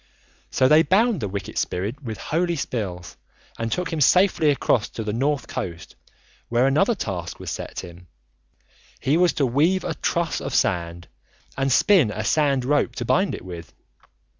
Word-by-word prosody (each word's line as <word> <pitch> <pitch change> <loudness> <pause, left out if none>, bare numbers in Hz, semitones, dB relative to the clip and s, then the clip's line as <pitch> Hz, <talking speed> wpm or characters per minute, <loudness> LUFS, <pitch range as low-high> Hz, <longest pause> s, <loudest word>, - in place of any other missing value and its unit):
So 130 - +3
they 155 +3 +6
bound 205 +4 +2
the 105 - -2
wicked 100 0 -4
spirit 105 +10 -3
with 115 -5 -6
holy 170 +2 -1
spells 100 - -5 0.4
and 115 0 -2
took 180 -2 -2
him 155 - -2
safely 180 0 +4
across 130 -5 +1
to 115 - -6
the 105 -1 -3
north 135 +2 -1
coast, 85 -2 -6 0.5
where 120 +2 +2
another 195 - +3
task 90 - -5
was - - -5
set - - -5
him. 85 +1 -12 0.9
He 140 - +1
was 175 +1 +3
to 140 - +1
weave 155 +10 +2
a 170 - -2
truss 170 0 -1
of 135 - -4
sand 85 -6 -1 0.5
and 135 0 0
spin 175 - +4
a 105 +1 -4
sand 140 +1 +1
rope 145 +2 +1
to - - -4
bind 190 +2 +1
it - - -11
with. 85 -4 -9
135 Hz, 170 wpm, -23 LUFS, 105-165 Hz, 0.9 s, they